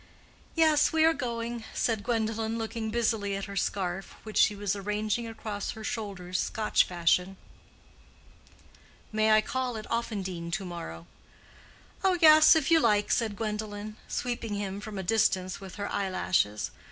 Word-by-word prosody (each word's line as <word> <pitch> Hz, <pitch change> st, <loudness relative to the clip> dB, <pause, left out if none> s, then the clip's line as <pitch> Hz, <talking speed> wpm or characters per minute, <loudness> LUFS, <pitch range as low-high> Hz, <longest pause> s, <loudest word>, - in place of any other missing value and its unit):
"Yes, 315 Hz, -2 st, +4 dB
we 320 Hz, 0 st, +4 dB
are 325 Hz, -, +5 dB
going," 235 Hz, -4 st, -4 dB
said 225 Hz, -3 st, 0 dB
Gwendolen, 225 Hz, -1 st, -1 dB
looking 225 Hz, 0 st, -3 dB
busily 220 Hz, -3 st, 0 dB
at 195 Hz, -, -4 dB
her 200 Hz, -, -8 dB
scarf, 190 Hz, -1 st, -2 dB
which 215 Hz, -1 st, -2 dB
she 210 Hz, -, +5 dB
was 205 Hz, 0 st, -1 dB
arranging 210 Hz, +3 st, -2 dB
across 215 Hz, -2 st, -5 dB
her 220 Hz, -, -9 dB
shoulders 190 Hz, -5 st, -4 dB
Scotch 215 Hz, -1 st, +2 dB
fashion. 180 Hz, +2 st, +1 dB, 1.7 s
"May 215 Hz, 0 st, +2 dB
I 215 Hz, 0 st, +6 dB
call 250 Hz, +1 st, -2 dB
at 215 Hz, -, -7 dB
Offendene 190 Hz, -7 st, -3 dB
to 190 Hz, -, -2 dB
morrow?" 85 Hz, -, -7 dB, 1.0 s
"Oh 375 Hz, -2 st, +3 dB
yes, 310 Hz, -1 st, +8 dB
if 315 Hz, 0 st, +1 dB
you 330 Hz, -, +7 dB
like," 210 Hz, -6 st, +2 dB
said 225 Hz, -4 st, +1 dB
Gwendolen, 210 Hz, 0 st, -4 dB
sweeping 235 Hz, -3 st, -3 dB
him 200 Hz, 0 st, -4 dB
from 210 Hz, -1 st, -7 dB
a 190 Hz, -, -3 dB
distance 190 Hz, -2 st, +1 dB
with 190 Hz, -1 st, -9 dB
her 205 Hz, -1 st, -4 dB
eyelashes. 185 Hz, -, 0 dB
215 Hz, 150 wpm, -28 LUFS, 195-230 Hz, 1.7 s, yes